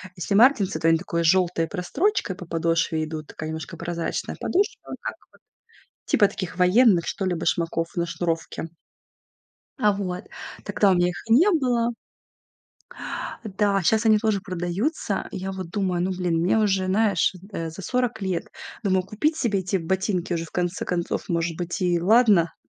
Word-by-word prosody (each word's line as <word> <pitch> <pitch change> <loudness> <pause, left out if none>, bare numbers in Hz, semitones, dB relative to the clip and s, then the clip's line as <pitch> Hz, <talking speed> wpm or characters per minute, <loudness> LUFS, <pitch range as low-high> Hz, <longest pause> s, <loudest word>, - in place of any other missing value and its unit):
если 185 +2 -2
"Мартинсы", 220 -4 +4
то 165 - +1
они 165 0 +5
с - - -8
такой 170 -2 -2
жёлтой 170 -1 +2
прострочкой 205 - -1
по 180 - -9
подошве 165 -1 0
идут, 155 0 -5
и - - -35
такая 155 - -6
немножко 160 0 -6
прозрачная 170 -1 -3
подошва, 400 +3 -1
как - - -4 0.7
вот - - -3
таких 185 -2 -6
военных, 185 0 +5
что 195 - -3
ли, 185 -1 0
башмаков 165 0 -1
на 170 - 0
шнуровке. 165 -2 -3 1.2
А, 210 -4 +4
вот, 190 -1 -4 0.4
тогда 200 -2 +2
у - - +5
меня 175 0 +3
их 175 - -7
не 290 - +6
было. 245 -7 +1 1.5
Да, 200 -1 +1
щас 220 +5 +2
они 220 -1 +6
тоже 215 -2 +1
продаются. 190 - -2
И - - -5
я 190 +1 -4
вот 190 -3 -6
думаю: 185 -2 -1
ну, 190 - 0
блин, 180 -3 0
мне 180 +6 +2
уже, 195 -3 +2
знаешь, 195 -1 +2 0.2
э, 165 -4 -4
за 160 +5 -9
40 250 +1 -1
лет. 190 -3 -2 0.4
Думаю, 190 -2 +2
купить 220 - 0
себе 225 -8 +1
эти 185 +1 -1
ботинки 185 +1 -1
уже, 165 -1 -2
в - - -16
конце 180 0 -2
концов, 175 -1 -2
может 170 -1 -1
быть, 175 +4 -4
и 175 -1 +2
ладно, 200 -3 +4
185 Hz, 170 wpm, -24 LUFS, 170-210 Hz, 1.5 s, не